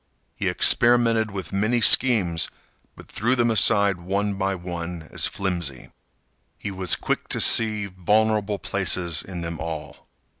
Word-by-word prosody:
He - - -2
experimented 115 -2 +3
with 100 -1 -8
many 110 +5 0
schemes, 105 -9 +3 0.5
but - - -15
threw 120 +5 -1
them 120 -2 +1
aside 100 -2 +3
one 100 +3 -2
by 95 0 -2
one 85 -2 -7
as - - +1
flimsy. 85 -9 -5 0.7
He 100 - -6
was 95 -2 +1
quick - - -3
to - - -2
see 110 -2 +3
vulnerable 105 +2 0
places 90 -4 0
in 90 -2 -8
them 85 -1 -6
all. 80 -2 -7
100 Hz, 140 wpm, -23 LUFS, 90-110 Hz, 0.7 s, experimented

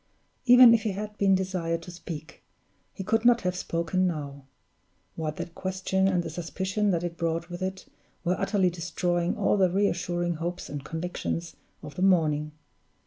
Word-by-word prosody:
Even 245 -1 +9
if 230 - +3
he 215 -3 -1
had 210 +2 -5
been 195 -1 +4
desired 180 -3 -2
to 180 - -9
speak, 165 -3 -8 0.5
he 190 - -7
could 225 +3 +1
not 240 0 +5
have 180 0 -1
spoken 180 +1 0
now, 140 -5 -5 0.7
while 155 -1 -2
that 170 +2 -7
question 190 +1 0
and 180 -2 +1
the 165 - -5
suspicion 190 +5 -2
that 175 -3 +1
it 170 -1 -4
brought 165 +1 -2
with 175 +1 -6
it 190 0 -4 0.4
were 180 +1 +1
utterly 190 -4 +2
destroying 175 0 -1
all - - +2
the 190 -2 +4
re 200 +3 +2
assuring 175 -2 -1
hopes 175 +3 -4
and 145 -1 -5
convictions 165 +1 -4 0.3
of 145 - -8
the 180 - -6
morning. 155 -5 +3
180 Hz, 175 wpm, -27 LUFS, 165-190 Hz, 0.7 s, Even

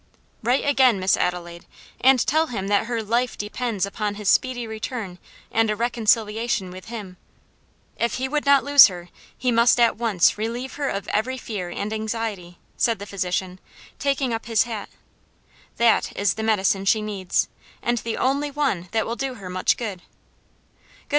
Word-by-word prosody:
"Write 245 +4 +1
again, 260 -7 +4
Miss 185 0 +3
Adelaide, 175 -1 -3 0.3
and 260 -1 +4
tell 315 +3 +2
him 200 -7 -4
that 205 +2 +2
her 235 -2 -2
life 235 +3 0
depends 210 -1 -2
upon 205 +1 -3
his 210 -1 -6
speedy 250 +2 +2
return 220 -4 -5 0.3
and 225 0 +2
a 210 - +1
reconciliation 225 -2 0
with 185 0 -10
him. 210 -6 -8 0.8
If 235 -1 0
he 260 +1 -2
would 295 +2 -1
not 280 -1 +5
lose 285 -1 +9
her 175 -3 -9 0.3
he 250 -1 0
must 235 +1 +4
at 235 -3 +4
once 215 -4 +2
relieve 235 +4 -3
her 285 -2 -2
of 200 - -4
every 255 +5 -1
fear 200 -8 -5
and 205 +4 -4
anxiety," 215 -5 -4 0.2
said 230 -2 +2
the 200 - -8
physician, 185 -1 -3 0.4
taking 275 -3 0
up 225 +1 -4
his 225 -2 +3
hat. 225 -4 -6 0.9
"That 235 -1 +2
is 200 -2 +2
the 220 - -5
medicine 200 -3 +1
she 215 +2 +3
needs, 200 -4 -1 0.4
and 240 0 +1
the 230 0 -4
only 280 +3 0
one 275 -12 -1
that 220 -1 +1
will 230 - -3
do 265 0 -3
her 190 -5 -8
much 185 0 +1
good. 205 -7 -5
220 Hz, 170 wpm, -23 LUFS, 200-245 Hz, 0.9 s, lose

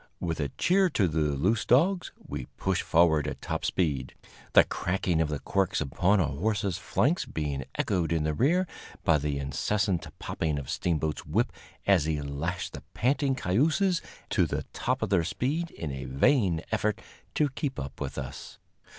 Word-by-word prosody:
With 85 -2 -2
a 70 -2 -1
cheer 190 +1 +4
to 105 - +2
the 80 0 -1
loose 80 +9 +1
dogs, 175 +9 +3
we 70 -3 -7
pushed 95 -1 0
forward 80 -3 +3
at 75 - -4
top - - -3
speed, 70 -8 -1 0.4
the - - +9
cracking 90 -2 0
of 80 - +1
the 75 - -1
quirts 95 +7 0
upon 90 +8 +2
our 80 -5 +2
horses' 100 +4 -1
flanks 160 +9 +1
being 70 -4 -3
echoed 85 -5 0
in 80 -2 +1
the 75 0 0
rear 165 - +3 0.4
by 80 -2 +4
the 70 0 -1
incessant 90 +7 0
popping 80 -3 -2
of 70 0 -4
Steamboat's 80 -2 -1
whip - - +1 0.3
as 95 -6 +4
he 80 -1 0
lashed 75 +5 -3
the - - -7
panting 135 +3 +2
cayuses 160 - +2 0.3
to - - +3
the - - -2
top - - -1
of - - -2
their 90 -4 +4
speed 150 - -1
in 80 - -5
a 65 0 -5
vain 85 - +2
effort 105 -1 0 0.4
to 150 -2 +3
keep 135 0 -3
up 70 +1 -7
with 70 -2 -4
us. 65 0 -7
85 Hz, 175 wpm, -28 LUFS, 75-110 Hz, 0.4 s, the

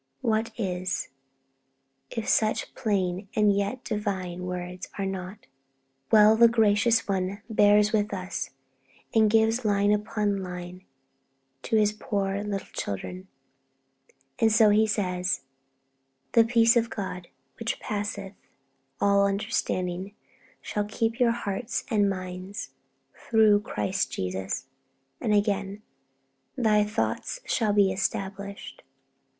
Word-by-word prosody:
What 220 0 +1
is, 185 -3 -2 1.0
if 225 - -4
such 215 -1 +1
plain 195 -4 -1
and 210 -2 +4
yet 200 +6 -2
divine 190 -4 -3
words 180 +1 -5
are 195 - -1
not? 190 +2 -6 0.7
Well, 215 0 +7
the 235 +1 +7
Gracious 225 0 +3
One 195 +1 -2
bears 210 -1 +4
with 210 -1 +1
us, 185 -2 -4 0.6
and 220 -1 +5
gives 225 +2 +3
line 205 -1 +2
upon 210 -1 -1
line 180 0 -7 0.8
to 175 - -1
His 210 -1 +3
poor 200 -2 -2
little 200 -2 -3
children. 180 - -5 1.1
And 225 -1 +4
so 215 -1 +6
He 215 +1 +4
says, 185 -3 -1 0.9
'The 230 -1 +5
peace 230 0 +4
of 235 0 +2
God, 185 -4 -5 0.3
which 230 -1 -2
passeth 205 -1 -4 0.7
all 200 0 +4
understanding, 195 -2 -2 0.5
shall 210 -1 -2
keep 225 +3 -2
your 245 -2 +4
hearts 230 0 -3
and 205 -2 +3
minds, 185 +1 -6 0.4
through 220 -2 +3
Christ 190 -2 -2
Jesus.' 95 +3 -3 0.5
And 220 - -1
again, 205 0 0 0.7
'Thy 215 -4 +3
thoughts 220 - -2
shall 220 -3 +1
be 200 -2 +4
established.' 195 +1 -4
205 Hz, 115 wpm, -27 LUFS, 190-220 Hz, 1.1 s, Well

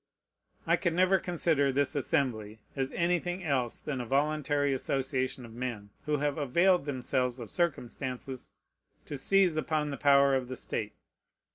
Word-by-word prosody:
I - - +3
can 170 -3 -1
never 185 +1 +4
consider 160 -6 +1
this 140 +2 +1
Assembly 125 -8 -1 0.2
as 135 -1 -2
anything 175 +1 0
else 130 -7 0
than 135 -4 -4
a - - -5
voluntary 145 +1 +1
association 130 -1 -2
of 115 - -12
men 115 -4 -5 0.2
who 150 -1 +2
have 145 +1 -1
availed 170 +5 +3
themselves 125 -2 -1
of 115 -5 -8
circumstances 130 -5 -3 0.6
to 145 - -6
seize 180 +3 +3
upon 155 -1 0
the 140 - -4
power 140 -1 +5
of 130 -2 0
the 130 - -5
state. 105 -3 -4
140 Hz, 150 wpm, -30 LUFS, 130-155 Hz, 0.6 s, power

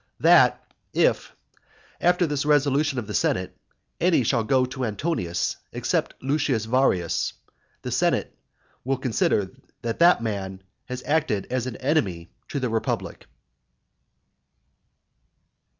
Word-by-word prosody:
That, - - +6 0.3
if, - - +2 0.7
after 175 +1 +3
this 145 -3 -1
resolution 145 -1 +2
of 120 - -2
the - - -6
senate, - - 0 0.4
any 175 -5 +3
one - - -2
shall 115 -1 +2
go 130 +3 +2
to 130 +1 -5
Antonius 105 - -2
except - - -1
Lucius 135 -5 0
Varius, 110 -8 +1 0.5
the - - -4
senate - - 0 0.5
will 135 +1 0
consider 110 -6 0 0.3
that 115 -1 -3
that 170 -7 +5
man 95 -3 -4 0.2
has 125 0 -6
acted 150 -10 0
as 130 -1 -1
an 125 - -5
enemy 100 - -1 0.2
to 140 - -3
the 125 -2 -1
republic." 115 0 -3
130 Hz, 120 wpm, -24 LUFS, 110-145 Hz, 0.7 s, That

